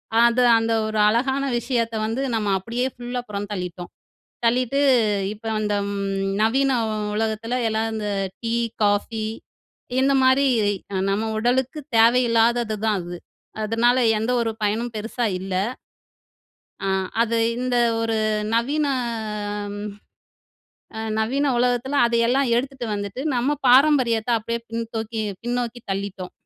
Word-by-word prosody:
அ - - +5
அது 245 +1 +2 0.2
அந்த 225 0 0
ஒரு 215 -1 -2
அழகான 265 +5 +1 0.2
விஷயத்த 235 -2 -1
வந்து 225 +4 -2
நம்ம 215 -2 -1
அப்படியே 235 +6 -2
ஃபுல்லா 245 0 -4
புறம் 205 0 -4
தள்ளிட்டோம். 180 -2 -6 0.5
தள்ளிட்டு 250 +3 +2 0.5
இப்ப 215 +2 -16 0.2
இந்த 210 -1 0 0.2
ம் 195 -1 -2 0.2
நவீன 270 +5 +2 0.4
உலகத்தில 220 +2 -1
எல்லாம் 220 +1 -1
இந்த 210 -1 -3 0.3
டீ, 230 0 -1 0.3
காஃபி 210 +2 0 0.8
இந்த 275 +1 +3
மாரி 260 +2 +4 0.5
அ - - -2
நம்ம 205 +3 0
உடலுக்கு 255 +6 0 0.2
தேவையில்லாததுதான் 230 -2 +3
அது. 175 0 -7 0.5
அதனால 230 +3 +2 0.2
எந்த 225 +3 -1
ஒரு 225 -1 0
பயனும் 225 +3 -1
பெருசா 225 +3 -2
இல்ல. 190 0 -5 1.3
ஆ. - - 0 0.3
அது 230 0 0 0.2
இந்த 250 0 0 0.2
ஒரு 225 -1 0 0.4
நவீன. 280 +7 +1 0.7
அ 205 0 -4
ம். 205 +1 -5 1.3
நவீன 270 +6 +1
உலகத்தில 250 +3 +1
அதையெல்லாம் 235 +3 +2
எடுத்துட்டு 260 0 -2
வந்துட்டு 205 +4 -4
நம்ம 260 +5 +1
பாரம்பரியத்த 250 -4 +4
அப்படியே 230 +2 -3
பின்னோக்கி- 225 -1 -4 0.2
பின்னோக்கி 240 0 -2
தள்ளிட்டோம். 195 -1 -4
230 Hz, 120 wpm, -23 LUFS, 215-245 Hz, 1.3 s, அ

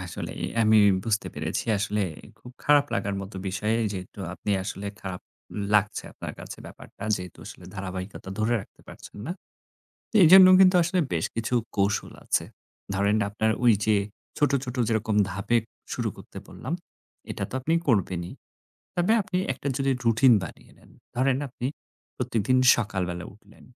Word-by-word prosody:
আসলেই। 90 -2 -6 0.2
আমি 110 0 +5 0.3
বুঝতে 110 -2 0
পেরেছি - - -2
আসলে 105 +1 0 0.4
খুব 125 - -12
খারাপ 145 -1 +5
লাগার 100 0 -1
মতো 95 0 -9
বিষয়। 105 +4 -1 0.2
যেহেতু 95 +1 -8 0.2
আপনি 90 +4 -4
আসলে 100 +1 -5
খারাপ 95 -2 -6 0.5
লাগছে 105 +1 +2
আপনার - - -7
কাছে - - -9
ব্যাপারটা। - - -13
যেহেতু 90 -1 -9
আসলে - - -11
ধারাবাহিকতা 95 0 -6
ধরে 110 +2 +2
রাখতে - - -16
পারছেন - - -12
না। 170 - -2 0.9
এইজন্যও 185 +2 +9
কিন্তু 185 -1 +6
আসলে 180 +2 0
বেশ 80 -1 0
কিছু 115 +1 -2 0.2
কৌশল 100 0 0
আছে। - - +1 0.5
ধরেন, 100 +2 +2
আপনার 110 +2 +1
ওই 120 -2 +7
যে 110 -1 +4 0.4
ছোট, 145 -1 +3
ছোট 125 -1 -6
যেরকম 110 -1 0
ধাপে 100 +5 0 0.4
শুরু - - -1
করতে - - -12
বললাম, - - -6 0.6
এটা - - -4
তো - - -15
আপনি 160 +5 0
করবেনই। 95 -6 +1 0.6
তবে 175 +4 +2
আপনি 190 -2 -3 0.2
একটা 135 - -6
যদি 135 -1 +1
routine 115 +2 +6
বানিয়ে 85 - -10
নেন। - - -21 0.3
ধরেন, 130 +1 +2
আপনি 125 -1 -7 0.5
প্রতিদিন 115 +3 +1 0.2
সকালবেলা 90 -6 -3
উঠলেন। 105 0 -20
110 Hz, 150 wpm, -26 LUFS, 95-130 Hz, 0.9 s, এইজন্যও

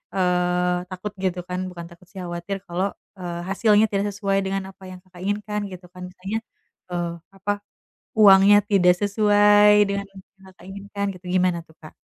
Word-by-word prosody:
eee, 180 -1 +1
takut, 190 +2 -6
gitu 185 -1 -2
kan. 180 0 -3
Bukan 170 -2 -9
takut 170 +1 -17
sih, 195 - -10
khawatir 175 +3 -4
kalau, 185 +3 -2 0.3
e - - -8 0.3
hasilnya 210 +2 +4
tidak 200 0 0
sesuai 195 -1 -1
dengan 195 0 -2
apa 190 - -20
yang 185 - -10
Kakak 180 -1 -15
inginkan, 210 +1 -2
gitu 180 0 -10
kan. 180 0 -9
Misalnya, 190 +4 -4 0.5
e - - -5 0.4
apa 195 +1 -2 0.7
uangnya 200 0 +8
tidak 180 -3 +5
sesuai 205 0 +5 0.2
dengan 200 0 -2
yang 195 -1 -13 0.3
Kakak 180 -1 -18
inginkan, 200 +1 -5
gitu. 180 0 -16
Gimana 180 -1 +2
tuh, 160 - -21
Kak? 155 - -13
195 Hz, 170 wpm, -23 LUFS, 180-205 Hz, 0.7 s, uangnya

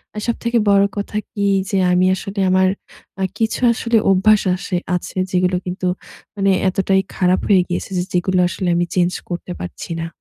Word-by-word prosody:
আর 210 - -4
সবথেকে 235 0 0
বড় 200 0 +5
কথা 205 +1 -3
কি? 200 -1 -2 0.2
যে 200 - 0
আমি 180 +1 +3
আসলে 195 +1 -6
আমার 185 0 +4 0.5
আ - - +1
কিছু 225 0 -1
আসলে 230 0 +1
অভ্যাস 210 +3 +4
আসে 185 0 -3 0.2
আছে 180 - -5
যেগুলো 180 0 +1
কিন্তু 185 0 -3 0.5
মানে 195 -1 +2 0.2
এতটাই 190 +1 +1
খারাপ 180 0 +2
হয়ে 195 -3 +5
গিয়েছে 175 +2 -4
যে 180 - +1
যেগুলো 180 +1 +1
আসলে 185 0 -4
আমি 175 0 +1
চেঞ্জ 180 -1 +2 0.2
করতে 175 0 -5
পারছি 180 - -7
না। 165 - -3
190 Hz, 175 wpm, -19 LUFS, 180-200 Hz, 0.5 s, বড়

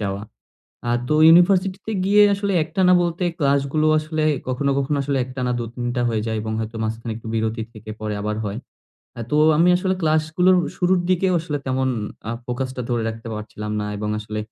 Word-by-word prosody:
যাওয়া। 100 -1 -3 0.7
আর 120 0 +2
তো - - +2
ইউনিভার্সিটি 185 +3 +5
তে 220 - -2
গিয়ে 205 +2 +5
আসলে 200 0 -2
একটানা 180 +3 +2
বলতে 175 +1 -2 0.2
ক্লাস 140 -2 +3
গুলো 155 0 +2
আসলে 155 0 -2 0.2
কখনো, 135 +2 0
কখনো 140 +1 0
আসলে 140 0 -1
একটানা 125 -1 -3
২-৩ 120 +1 -5
টা 120 - +1
হয়ে 110 -2 -1
যায় 110 -1 -1
এবং 110 0 -4
হয়তো 110 +1 -5
মাঝখানে 110 +1 -3
একটু 115 - -11
বিরতি 110 0 -1
থেকে 110 0 -10
পরে 105 -1 -3
আবার 105 0 -2
হয়। 105 +1 -3 0.6
আ - - -4
তো 150 - +1 0.2
আমি 170 +3 +4
আসলে 185 +1 0
ক্লাস 155 -1 +2
গুলোর 185 +1 +5 0.2
শুরুর 180 0 +2
দিকেও 185 0 +2
আসলে 150 -3 -3
তেমন 130 0 0 0.4
আ - - -1 0.2
ফোকাস 125 +1 -2
টা 125 - -3
ধরে 120 -2 0
রাখতে 115 +1 -7
পারছিলাম 105 0 -6
না - - -2
এবং 105 +1 -3
আসলে 105 0 -5
130 Hz, 200 wpm, -22 LUFS, 110-170 Hz, 0.7 s, ইউনিভার্সিটি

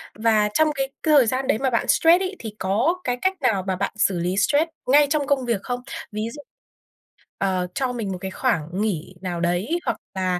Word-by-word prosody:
và 215 -1 +2
trong 315 -1 +3
cái 270 0 -1
cái 310 - +3
thời 250 -4 +5
gian 260 +3 -1
đấy - - +2
mà 265 +1 0
bạn 230 - 0
stress 340 +3 +5
ấy, 380 +1 -3
thì 215 -2 -7
có 240 - +1
cái 245 0 -1
cách 375 0 0
nào 195 -4 +2
mà 190 - 0
bạn 200 +2 -2
xử 190 -4 +2
lý 180 +3 -1
stress 290 +10 +2 0.2
ngay 290 +2 +6
trong 295 -2 0
công 270 -3 +1
việc 230 -5 0
không? 245 0 -3 0.3
Ví 215 +2 -3
dụ, 290 - -9 1.0
ờ, 185 -2 0
cho 255 -2 -1
mình 215 -5 -3
một 185 - -3
cái 190 -1 -4
khoảng 175 - 0
nghỉ 185 -4 -2
nào 175 -2 -3
đấy 180 - 0
hoặc - - -1 0.2
là 185 -1 0
225 Hz, 225 wpm, -23 LUFS, 190-280 Hz, 1.0 s, ngay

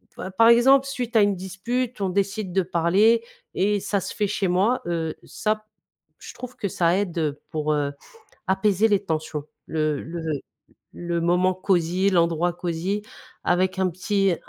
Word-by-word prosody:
pa - - -6
par 225 +5 +5
exemple, 265 +4 +6
suite 250 -4 -4
à 220 - +7
une 205 -1 +2
dispute 225 +7 -3
on 195 -2 0
décide 200 0 -1
de 190 - +3
parler 190 +6 +3 0.3
et 205 +2 +2
ça 200 +1 -1
se - - -6
fait 210 - 0
chez 200 -1 -1
moi, 195 +8 +2
heu, 165 -2 -2
ça, 215 0 -2 0.5
je - - -10
trouve 250 0 -8
que 200 - -3
ça 170 -1 +2
aide, 185 -4 -3
heu, 150 -3 -1
pour, 155 -1 -1
heu, 145 -1 0 0.6
apaiser 195 +2 +2
les 205 -2 +1
tensions, 155 -3 -3 0.2
le 155 -2 -1
le 170 +1 -6 0.7
le 170 -1 -2
moment 180 +2 +2
cosy 185 0 +1
l'endroit 170 -1 +2
cosy, 175 +4 -2 0.4
avec 185 +2 +1
un 190 -1 +2
petit 195 +2 +1
190 Hz, 165 wpm, -24 LUFS, 170-210 Hz, 0.7 s, à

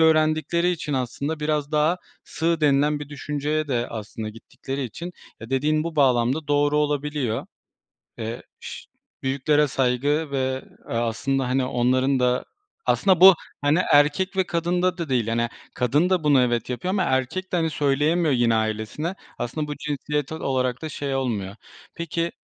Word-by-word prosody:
öğrendikleri 160 +2 +3
için 155 -4 -3
aslında 140 +4 -2
biraz 150 -1 -1
daha 155 +4 +3 0.3
sığ 165 0 -1
denilen 145 0 +3
bir 145 - -7
düşünceye 150 +1 -2
de, 120 -2 0
aslında, 110 0 -6
gittikleri 135 +5 -6
için, 170 +10 -7 0.3
ya, 115 - -9
dediğin 155 +4 +1
bu 165 -2 -5
bağlamda 130 +2 +2
doğru 145 +1 +3
olabiliyor. 145 -5 -1 0.7
Eee, 115 +1 -4 0.2
ş - - -8 0.4
büyüklere 145 +3 +2
saygı 140 +4 0
ve, 130 -1 -1 0.3
eee, - - -3
aslında, 125 +3 0
hani, 130 0 +1
onların 130 +2 +2
da 125 0 +1 0.4
Aslında 185 -3 +3
bu, 190 0 +11 0.3
hani, 145 +4 +3
erkek 150 +7 +3
ve 190 - +3
kadında 175 +2 0
da 170 -5 -4
değil, 120 -4 +1
yani, 115 +1 0 0.3
kadın 145 +9 +2
da 180 -4 +2
bunu 145 -3 +5
evet, 120 -2 0
yapıyor 130 +9 -3
ama 195 - +2
erkek 130 +9 -1
de, 180 - +1
hani, 160 -1 +1
söyleyemiyor 150 +3 +2
yine 120 -2 +3
ailesine. 110 - -2 0.2
Aslında 150 +5 -3
bu 150 - -4
cinsiyetsel 150 +1 -3
olarak 130 -2 0
da 155 - -4
şey 140 -2 -3
olmuyor. 105 -7 -2 0.4
Peki 170 0 -2
145 Hz, 155 wpm, -24 LUFS, 125-155 Hz, 0.7 s, bu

